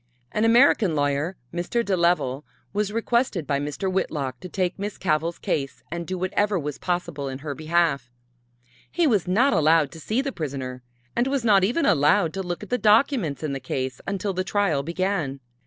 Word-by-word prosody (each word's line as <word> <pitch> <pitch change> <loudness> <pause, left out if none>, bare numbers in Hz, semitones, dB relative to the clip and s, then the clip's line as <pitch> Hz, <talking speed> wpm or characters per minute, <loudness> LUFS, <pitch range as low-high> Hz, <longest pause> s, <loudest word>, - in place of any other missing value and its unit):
An 215 +1 +1
American 230 - +5
lawyer, 145 +5 0 0.2
Mr. 180 +7 -1
de 195 - +1
Leval, 170 -6 +1 0.3
was 205 0 0
requested 230 - 0
by 140 -1 0
Mr. 150 +6 -3
Whitlock 140 -8 -2
to 180 - -8
take 185 +1 -2
Miss 205 +1 -4
Cavell's 165 -1 0
case 135 -2 -3
and 170 -1 -4
do 185 - -3
whatever 195 +2 0
was 150 -3 -4
possible 170 -6 -2
in 130 - -5
her 145 - -2
behalf. 155 -4 0 0.8
He 345 -1 +2
was 210 - +2
not 230 +9 +3
allowed 160 -3 +4
to 160 - -10
see 215 - -1
the 275 0 -1
prisoner 130 - -5 0.3
and 240 +2 +2
was 270 -3 -1
not 200 -4 +5
even 250 - +1
allowed 160 - +3
to 195 - -3
look 175 +1 -4
at 210 - -11
the 250 - +1
documents 210 - +3
in 150 -3 -2
the 135 - -3
case 130 0 -4
until 200 0 -2
the 185 +1 -1
trial 195 -7 +1
began. 170 -3 -2
175 Hz, 190 wpm, -24 LUFS, 145-205 Hz, 0.8 s, American